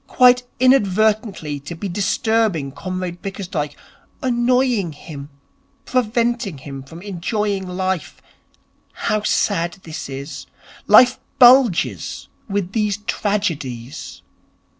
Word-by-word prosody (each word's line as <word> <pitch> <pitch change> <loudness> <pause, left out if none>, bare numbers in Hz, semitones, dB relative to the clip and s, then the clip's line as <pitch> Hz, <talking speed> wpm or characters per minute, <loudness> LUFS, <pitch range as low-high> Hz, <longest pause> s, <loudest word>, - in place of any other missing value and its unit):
Quite 250 -1 +5 0.2
inadvertently 215 - +2
to 140 +5 -8
be 200 +5 -5
disturbing 200 -4 0
Comrade 180 +3 -5
Bickersdyke, 180 -7 -4 0.5
annoying 245 -6 +1
him, 145 -1 -9 0.6
preventing 235 - 0
him 135 0 -8
from 160 +6 -12
enjoying 200 0 -2
life. 185 -2 -3 0.7
How 215 0 -1
sad 175 -4 +1
this 160 -2 -7
is. 140 +1 -7 0.4
Life 245 +4 +7 0.2
bulges 235 - +4 0.2
with 200 -2 -1
these 210 -2 0
tragedies.' 150 - -3
195 Hz, 95 wpm, -20 LUFS, 160-220 Hz, 0.7 s, Life